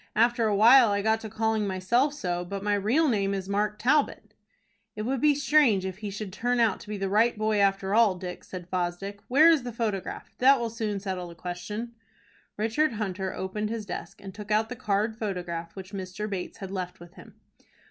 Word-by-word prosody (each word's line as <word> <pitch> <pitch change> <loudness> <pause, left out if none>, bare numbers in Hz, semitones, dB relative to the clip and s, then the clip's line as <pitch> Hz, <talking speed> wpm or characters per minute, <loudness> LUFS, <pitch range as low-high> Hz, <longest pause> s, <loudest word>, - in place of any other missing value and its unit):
After 235 +1 +3
a 210 - +1
while 235 +3 +7
I 200 0 0
got 220 +1 +2
to 220 - -7
calling 220 0 0
myself 235 +10 +1
so, 175 -9 -2
but 195 +2 -6
my 205 0 +1
real 225 +11 +2
name 200 -5 +1
is 190 -1 -4
Mark 210 +1 0
Talbot." 245 -4 +1 0.6
"It 215 - -4
would 260 +2 -1
be 300 -1 +4
strange 275 -9 +3
if 190 0 -5
he 210 -1 -4
should 200 -1 -6
turn 245 +3 0
out 225 -4 +2
to - - -13
be 210 - -3
the 195 0 -2
right 220 +4 +2
boy 215 -1 +1
after 195 0 +1
all, 220 -4 +5
Dick," 180 0 -7
said 180 -2 -8
Fosdick. 185 +3 -3
"Where 290 +6 +6
is 320 -4 +3
the 245 0 -5
photograph? 215 -4 -4
That 270 +1 +6
will 235 -1 -2
soon 215 -3 -3
settle 190 -2 -4
the 170 - -11
question." 210 +7 -6 0.6
Richard 230 +7 +1
Hunter 190 -3 -3
opened 210 +3 -3
his 225 -1 -4
desk, 180 - -7
and 195 -1 -8
took 210 +1 -9
out 215 +1 +2
the 250 - -5
card 215 +1 -1
photograph 175 -5 -4
which 190 0 -9
Mr. 190 +2 -5
Bates 195 -4 -5
had 195 -1 -7
left 185 -2 -5
with 175 0 -13
him. - - -15
210 Hz, 210 wpm, -27 LUFS, 190-230 Hz, 0.6 s, while